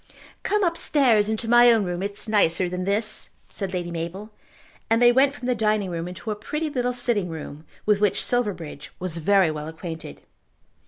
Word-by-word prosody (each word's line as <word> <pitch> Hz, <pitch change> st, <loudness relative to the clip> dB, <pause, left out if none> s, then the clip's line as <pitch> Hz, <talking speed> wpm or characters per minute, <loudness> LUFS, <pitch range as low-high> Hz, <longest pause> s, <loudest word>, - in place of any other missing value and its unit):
"Come 420 Hz, 0 st, 0 dB
upstairs 270 Hz, -, +2 dB
into 220 Hz, +1 st, -2 dB
my 240 Hz, +1 st, +7 dB
own 225 Hz, -3 st, +3 dB
room, 175 Hz, -1 st, -3 dB
it 200 Hz, +1 st, -3 dB
is 205 Hz, -, -5 dB
nicer 190 Hz, -4 st, +2 dB
than 180 Hz, +1 st, -4 dB
this," 210 Hz, +3 st, 0 dB, 0.2 s
said 195 Hz, -3 st, -3 dB
Lady 175 Hz, -2 st, -3 dB
Mabel, 170 Hz, +6 st, -5 dB, 0.6 s
and 225 Hz, 0 st, +3 dB
they 240 Hz, 0 st, +6 dB
went 270 Hz, +3 st, +3 dB
from 250 Hz, -, -8 dB
the 250 Hz, -, +2 dB
dining 215 Hz, -4 st, 0 dB
room 170 Hz, 0 st, -4 dB
into 185 Hz, +5 st, -6 dB
a -, -, -2 dB
pretty 300 Hz, +9 st, -4 dB
little 250 Hz, -3 st, 0 dB
sitting 240 Hz, -7 st, 0 dB
room 155 Hz, -1 st, -8 dB, 0.2 s
with 210 Hz, -1 st, +2 dB
which 205 Hz, -2 st, +2 dB
Silverbridge 180 Hz, -, -3 dB
was 180 Hz, -2 st, -3 dB
very 190 Hz, 0 st, +3 dB
well 150 Hz, 0 st, -6 dB
acquainted. 160 Hz, -, -8 dB
205 Hz, 190 wpm, -24 LUFS, 175-240 Hz, 0.6 s, my